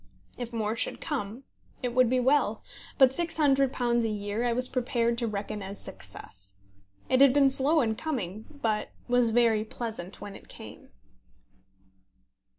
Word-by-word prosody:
If 245 -1 -6
more 220 -1 -1
should - - 0
come, 250 -5 -4 0.4
it 245 -1 -1
would 255 -1 +4
be 255 +1 +2
well; 250 -4 +2 0.3
but 265 -3 +7
£600 270 -6 +2
a 225 - 0
year 205 +2 -2
I 240 - +2
was 250 +2 +1
prepared 235 -2 0
to 235 - -1
reckon 210 0 -4
as 195 +1 -7
success. 95 +1 -9 0.5
It 255 +1 +3
had 275 -2 +8
been 275 -1 +5
slow 290 +4 +3
in 225 -3 +1
coming, 220 - -4
but 230 -8 -2 0.2
was 245 -1 +4
very 225 -2 +3
pleasant 215 -5 -6
when 200 -1 -8
it - - -13
came. - - -11
235 Hz, 155 wpm, -28 LUFS, 215-265 Hz, 0.5 s, had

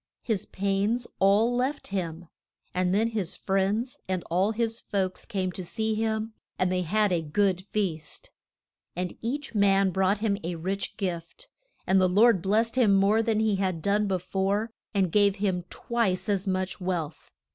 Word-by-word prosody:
His 220 -6 -1
pains 200 +5 0
all 210 +5 +4
left 265 +4 -1
him; 175 -3 -4 0.5
and 180 0 +1
then 215 +4 +2
his 200 -6 -3
friends 200 +6 -1
and 185 -2 -1
all 185 +4 +3
his 225 0 -1
folks 190 -2 -2
came 190 -5 -2
to 185 - -6
see 220 +5 -2
him 220 0 -1 0.2
and 185 0 +1
they 185 0 +1
had 210 +4 +1
a 170 - +1
good 185 +4 +1
feast. 175 -7 -3 0.6
And 180 0 -3
each 275 +5 -3
man 195 -2 +3
brought 190 +2 +2
him 205 -1 0
a 170 +1 -3
rich 190 +4 -3
gift, 180 - -5 0.4
and 190 0 +4
the 185 - +4
Lord 205 +1 +5
blest 220 +6 +1
him 210 -5 +5
more 200 +3 +4
than 225 -1 +1
he 215 -3 +2
had 185 -3 -1
done 205 +1 +2
be 190 -1 +1
fore, 195 +4 -1 0.2
and 190 -5 +1
gave 200 0 +4
him 190 -4 -1
twice 200 -5 -1
as 200 -1 0
much 185 0 -2
wealth. 170 -4 -3
195 Hz, 170 wpm, -27 LUFS, 185-220 Hz, 0.6 s, Lord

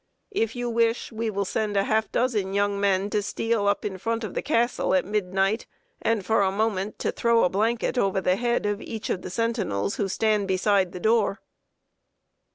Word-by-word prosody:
If 225 - -1
you 245 0 -2
wish, 230 0 +1
we 225 0 -2
will 200 -1 -1
send 210 +1 -1
a 195 - +3
half 220 +1 0
dozen 210 -6 0
young 200 0 +1
men 200 0 +1
to 210 - +1
steal 210 +1 -1
up 200 - +1
in 190 -2 -4
front 230 +3 -2
of 215 - -5
the - - -2
Castle 240 -7 +1
at 185 - +2
midnight; 195 +1 0 0.3
and, 225 -4 0
for 220 0 +3
a 190 -1 +2
moment, 210 -1 -1
to - - -1
throw 235 -1 +2
a - - +3
blanket 230 +5 0
over 195 -3 +1
the 185 0 +2
head 240 +1 0
of 205 0 -1
each 220 -2 -5
of 180 - -2
the - - -6
sentinels 190 - -1
who 200 - 0
stand 210 +1 +1
beside 190 -1 +2
the 180 - -7
door." 220 0 +2
210 Hz, 200 wpm, -25 LUFS, 195-230 Hz, 0.3 s, a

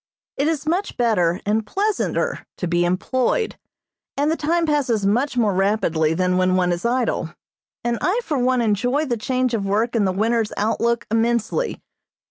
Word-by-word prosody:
It 280 - 0
is 315 -2 -1
much 355 +6 -1
better 185 -7 +2
and 215 +2 +1
pleasanter 405 - -1
to 180 - -3
be 175 +1 +1
employed, 255 - 0 0.6
and 290 +2 +2
the - - +1
time 330 +2 0
passes 260 -9 +1
much 245 +6 +1
more 215 -4 +2
rapidly 175 -5 +1
than 180 +1 +1
when 185 0 +2
one 180 -1 +2
is 175 +5 -3
idle, 235 -8 -1 0.5
and 235 0 -1
I 400 +6 +1
for 295 - -1
one 250 0 +2
enjoy 245 +8 +1
the 245 -4 -1
change 255 +2 -1
of 220 -3 0
work 215 +5 0
and 210 -4 +2
the - - +1
winter's 220 +3 0
outlook 235 +2 0
immensely. 235 - 0
230 Hz, 170 wpm, -21 LUFS, 195-265 Hz, 0.6 s, better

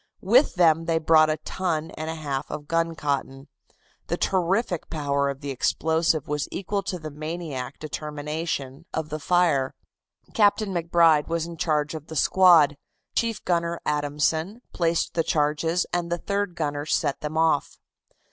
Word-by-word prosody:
With 240 +9 +4
them 165 -2 +4
they 165 0 +1
brought 155 -1 +5
a 155 - 0
ton 160 0 -3
and 155 +1 -5
a 160 - -3
half 140 -4 -4
of 145 -1 -6
guncotton. 145 -4 -2 0.6
The - - -1
terrific 190 0 0
power 140 -3 0
of 140 0 -6
the 140 -1 -4
explosive 160 +3 +1
was 150 -1 -2
equal 200 +1 -2
to 185 - -4
the 155 -2 -7
maniac 150 -3 -5
determination 150 -1 -5
of 160 -1 -3
the 155 0 -4
fire. 155 -5 +2 0.6
Captain 205 -1 +3
MacBride 165 -3 +3
was 165 -1 -1
in 170 0 -8
charge 150 -2 0
of 155 -1 -7
the 160 - -8
squad, 165 -3 +5 0.4
Chief 230 -2 -1
Gunner 170 -1 0
Adamson 150 - -1
placed 170 -1 0
the 165 - +1
charges 155 +4 +1
and 175 -1 -1
the 175 - +1
third 200 0 -2
gunner 145 -2 -3
set 140 - 0
them 150 +1 -4
off. 160 -3 +1
160 Hz, 155 wpm, -25 LUFS, 150-170 Hz, 0.6 s, brought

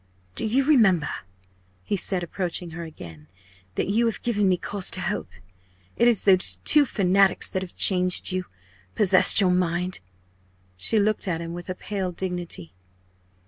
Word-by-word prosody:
"Do 100 - -2
you 260 +5 +1
remember," 215 - +3 0.7
he 205 - -2
said, 185 -1 -1
approaching 175 0 -4
her 165 +2 -7
again, 80 - -11 0.5
"that - - -1
you 225 +4 +1
have 225 - -4
given 210 -5 +1
me 180 - +2
cause 195 +1 -3
to - - -1
hope? 190 +3 -3 0.7
It 235 - +3
is 235 -5 +2
those 185 - +4
two 295 -1 +6
fanatics 195 -4 +2
that 185 - -2
have 185 -2 -9
changed 180 -1 +1
you 185 0 -3 0.5
possessed 190 -1 +6
your 190 -3 +3
mind." 180 0 -1 0.8
She 90 - 0
looked 210 0 0
at 165 -3 -1
him 170 0 -6
with 175 +1 -9
a 185 - -3
pale 190 -1 -4
dignity. 175 - -4
185 Hz, 160 wpm, -24 LUFS, 175-205 Hz, 0.8 s, two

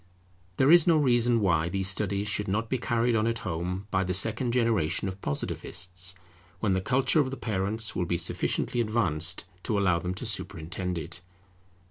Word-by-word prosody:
There 135 +3 +5
is 175 -1 +7
no 165 -2 +5
reason 120 -4 +3
why 85 -4 +2
these 95 +1 -1
studies 100 +1 0
should 105 0 -1
not 110 +4 -1
be 130 - +1
carried 120 0 +1
on 110 0 +2
at 115 0 0
home 90 +3 -3
by 95 0 +2
the 90 -1 -2
second 110 +5 +1
generation 115 -8 +1
of 95 +1 -6
Positivists, 90 +5 -3 0.4
when 100 -1 +1
the 95 - 0
culture 135 - +2
of 140 -3 +2
the 135 - -6
parents 110 +1 -1
will 90 - 0
be 85 0 0
sufficiently 90 +7 0
advanced 90 -7 0 0.2
to 105 0 -1
allow 90 -4 +2
them 90 +2 -4
to 115 - -6
superintend 90 -4 -3
it. 85 +2 -7
100 Hz, 180 wpm, -28 LUFS, 90-115 Hz, 0.4 s, is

